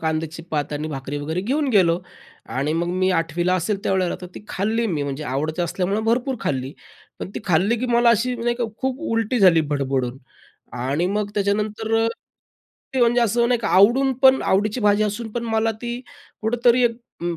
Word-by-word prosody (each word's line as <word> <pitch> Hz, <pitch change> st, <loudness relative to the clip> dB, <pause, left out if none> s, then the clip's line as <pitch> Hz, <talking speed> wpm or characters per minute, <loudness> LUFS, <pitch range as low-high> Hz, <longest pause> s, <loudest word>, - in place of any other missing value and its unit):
कांद्याची 160 Hz, 0 st, -2 dB
पात 150 Hz, -1 st, -2 dB
आणि 150 Hz, +1 st, -3 dB
भाकरी 140 Hz, 0 st, -5 dB
वगैरे 160 Hz, +5 st, -3 dB
घेऊन 275 Hz, +8 st, 0 dB
गेलो 175 Hz, -5 st, +4 dB, 0.6 s
आणि 140 Hz, +3 st, 0 dB
मग 170 Hz, +2 st, -1 dB
मी 185 Hz, 0 st, +2 dB
8वीला 165 Hz, +1 st, -2 dB
ला 180 Hz, -, +3 dB
असेल 195 Hz, +4 st, -1 dB
त्यावेळेला 190 Hz, -4 st, 0 dB
तर 180 Hz, -, -7 dB
ती -, -, -10 dB
खाल्ली 220 Hz, +4 st, 0 dB
मी 160 Hz, -7 st, -1 dB
म्हणजे 140 Hz, +1 st, -4 dB
आवडत 155 Hz, +6 st, -2 dB
असल्यामुळं 190 Hz, +5 st, -1 dB
भरपूर 245 Hz, +3 st, +1 dB
खाल्ली. 135 Hz, 0 st, -2 dB, 0.5 s
पण -, -, -6 dB
ती -, -, -4 dB
खाल्ली 190 Hz, +6 st, +2 dB
की 255 Hz, -, -1 dB
मला 235 Hz, 0 st, +5 dB
अशी 235 Hz, +3 st, +1 dB
नाही 240 Hz, +1 st, 0 dB
का 240 Hz, -, -1 dB, 0.2 s
खूप 265 Hz, +1 st, -2 dB
उलटी 225 Hz, +2 st, 0 dB
झाली 175 Hz, -4 st, +6 dB
भडभडून 135 Hz, -3 st, -1 dB, 0.6 s
आणि 140 Hz, +7 st, 0 dB
मग 205 Hz, +2 st, -1 dB
त्याच्यानंतर 215 Hz, +2 st, 0 dB, 0.9 s
ते 260 Hz, -, +1 dB
म्हणजे 240 Hz, 0 st, +4 dB
असं 235 Hz, +1 st, +2 dB
नाही 245 Hz, -2 st, +1 dB
की 220 Hz, -, -2 dB
आवडून 240 Hz, +9 st, +4 dB
पण 265 Hz, 0 st, +6 dB
आवडीची 210 Hz, +5 st, +1 dB
भाजी 205 Hz, 0 st, +3 dB
असून 215 Hz, +2 st, -3 dB
पण 235 Hz, +1 st, -3 dB
मला 225 Hz, 0 st, +1 dB
ती 240 Hz, 0 st, -4 dB, 0.4 s
कुठेतरी 240 Hz, +2 st, +3 dB
एक 230 Hz, -1 st, +1 dB, 0.3 s
उम्म, 170 Hz, -1 st, -2 dB
205 Hz, 185 wpm, -22 LUFS, 165-235 Hz, 0.9 s, झाली